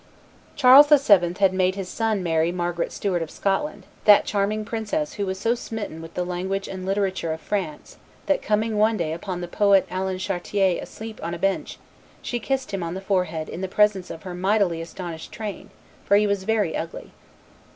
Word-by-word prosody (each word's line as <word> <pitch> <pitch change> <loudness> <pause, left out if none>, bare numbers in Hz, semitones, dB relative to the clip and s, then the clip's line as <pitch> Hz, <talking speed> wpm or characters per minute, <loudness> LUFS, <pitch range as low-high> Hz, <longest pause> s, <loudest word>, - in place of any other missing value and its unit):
Charles 275 +2 +8
VII. 205 - +5
had 195 -2 +4
made 185 0 +1
his 195 -2 -5
son 220 -1 -1
marry 165 0 +1
Margaret 175 -1 -2
Stuart 185 -4 -1
of 165 - -4
Scotland, 200 - -2 0.2
that 205 -1 +7
charming 210 +1 -1
princess 230 +8 -2
who 200 -2 -3
was 190 0 -2
so 230 +4 +2
smitten 220 -8 -6
with 165 0 -11
the 180 - -1
language 190 +2 -3
and 185 -1 -6
literature 195 -4 -1
of 160 - -6
France 175 -6 -4 0.3
that, 290 -2 +1
coming 215 0 0
one 220 +1 +3
day 160 -4 -1
upon 175 +2 -5
the 175 - -4
poet 195 0 +4
Alan 185 0 -2
Chartier 190 0 0
asleep 220 0 -9
upon 170 +1 -4
a - - -6
bench, 195 +2 -1 0.5
she 240 - -2
kissed 265 +2 -2
him 195 - -2
on 170 +1 -4
the - - -4
forehead 180 -5 -1
in 175 - -7
the 190 - -2
presence 195 -1 +2
of 160 - -8
her 185 - -6
mightily 185 -2 +1
astonished 165 -1 -7
train, 215 -3 -6 0.3
for 200 - +4
he 210 - +3
was 200 -2 -1
very 210 -6 +1
ugly. 165 +1 -6
195 Hz, 195 wpm, -24 LUFS, 175-210 Hz, 0.5 s, Charles